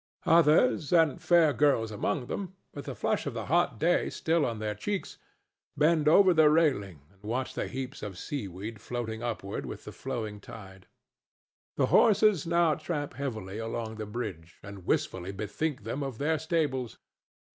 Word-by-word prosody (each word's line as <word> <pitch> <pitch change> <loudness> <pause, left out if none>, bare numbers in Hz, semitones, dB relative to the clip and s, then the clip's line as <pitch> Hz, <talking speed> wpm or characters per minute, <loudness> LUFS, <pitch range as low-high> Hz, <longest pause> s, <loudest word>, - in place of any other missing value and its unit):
Others, 165 - +4
and 160 -5 +3
fair 170 -4 +4
girls 135 -7 +2
among 110 +4 -2
them, 190 +6 -5 0.2
with 145 - -7
the - - -5
flush - - -1
of - - -4
the - - -4
hot - - +2
day - - +2
still 165 -2 +1
on 115 -2 -3
their 105 0 -2
cheeks, 190 - -4 0.6
bend 155 +1 +3
over 185 +4 +6
the 160 -2 +6
railing 130 - +1
and 100 - -29
watch 120 +5 -3
the - - -3
heaps 135 0 -6
of 95 -4 -6
seaweed 105 -3 -6
floating 115 -2 -4
upward 110 -5 -4
with - - -7
the - - -7
flowing 110 -6 -5
tide. 95 -2 -12 0.9
The - - +3
horses 210 -6 +5
now 170 -1 +3
tramp 150 -2 -4
heavily 110 -7 -5
along 115 0 -4
the 110 -1 -5
bridge 105 -8 -6
and 100 -3 -10
wistfully 95 +1 -1
bethink 105 +7 -3
them 115 +6 -4
of 135 -4 -4
their 155 +3 0
stables. 145 -6 -1
130 Hz, 165 wpm, -29 LUFS, 105-155 Hz, 0.9 s, over